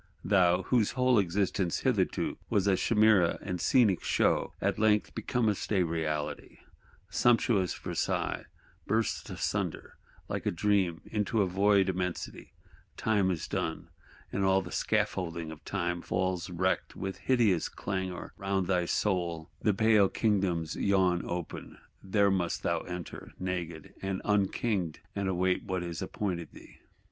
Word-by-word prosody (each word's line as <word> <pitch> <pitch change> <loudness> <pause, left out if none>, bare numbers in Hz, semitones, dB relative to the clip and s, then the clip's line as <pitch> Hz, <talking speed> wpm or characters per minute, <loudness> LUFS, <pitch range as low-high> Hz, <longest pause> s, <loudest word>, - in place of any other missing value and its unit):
Thou, 90 -2 +3
whose 115 +2 +2
whole 125 -3 +3
existence 95 0 0
hitherto - - 0
was 100 -2 +2
a 100 -1 +4
chimera 105 -5 +4
and 90 -3 -4
scenic 110 -8 +3
show, - - +1
at - - 0
length 105 -1 +2
becomest 110 -5 -1
a 95 -4 +3
reality: 80 -3 -3 0.5
sumptuous 115 -4 +3
Versailles - - -2 0.4
bursts 110 +2 0
asunder, - - -3 0.3
like - - -3
a - - +2
dream, 95 -3 +1
into 105 -1 0
void 100 +1 +3
Immensity; 90 -1 -3 0.5
Time 105 -4 +2
is 85 -4 -2
done, - - -3 0.4
and 100 - -1
all 95 0 +3
the 85 - -9
scaffolding 85 -3 -1
of 80 - -11
Time 85 0 -2
falls 90 -1 -1
wrecked 95 +1 -1
with 95 0 -4
hideous 115 -10 +2
clangour 95 -2 -4
round 95 -1 -1
thy 90 -1 +1
soul: 85 -4 -1
the 105 - +3
pale 105 -1 +4
Kingdoms 95 -7 0
yawn 95 -3 +2
open; 85 -1 -5 0.2
there 100 +1 +2
must 90 -3 -1
thou - - +1
enter, 90 -2 -7
naked, 85 -4 -4
all 95 -1 -2
unking'd, 100 -4 0 0.2
and 100 -1 -1
await 90 0 +1
what 95 -2 -2
is 85 -2 -5
appointed 90 -6 -3
thee! - - -15
95 Hz, 135 wpm, -30 LUFS, 90-105 Hz, 0.5 s, a